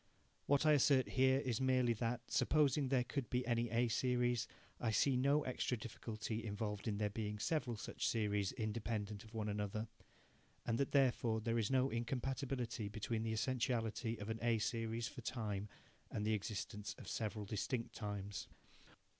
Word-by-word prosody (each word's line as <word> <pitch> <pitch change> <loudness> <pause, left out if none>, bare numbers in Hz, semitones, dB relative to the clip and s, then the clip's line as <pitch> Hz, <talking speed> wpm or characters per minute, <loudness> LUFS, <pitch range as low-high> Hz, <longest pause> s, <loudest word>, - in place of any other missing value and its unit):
What 145 +2 +4
I 155 - +7
assert 140 -2 +5
here 130 0 +4
is 125 -3 -1
merely 130 -2 +3
that, 115 +1 -1
supposing 150 -2 +3
that - - -4
there 130 -2 +3
could 130 0 -3
be 125 0 0
any 120 -1 +1
A 120 +2 +2
series, 120 0 +1 0.3
I 120 - 0
see 125 +5 +3
no 140 +4 +3
extra 125 -1 -1
difficulty 110 +1 -4
involved 105 0 -3
in 105 -2 0
there 105 -1 0
being 105 0 -3
several 125 -1 0
such 115 - -2
series 105 -3 +1
independent 110 -1 -2
of 110 +1 -13
one 110 -1 -1
another, 105 +1 -2 0.8
and 115 0 0
that 140 - +1
therefore 125 -4 +3
there 115 +1 0
is 105 - +1
no 135 0 +3
incompatibility 125 -1 -2
between 110 +2 -2
the 110 0 -1
essentiality 115 -1 0
of 105 +1 -6
an 110 - -3
A 120 -1 +3
series 115 +1 -1
for 125 - -8
time 105 -4 -3 0.4
and 105 - -2
the 110 - +2
existence 105 0 -3
of - - -10
several 110 -3 -2
distinct 115 +4 -2
times. 100 -3 -4
115 Hz, 170 wpm, -39 LUFS, 105-125 Hz, 0.8 s, I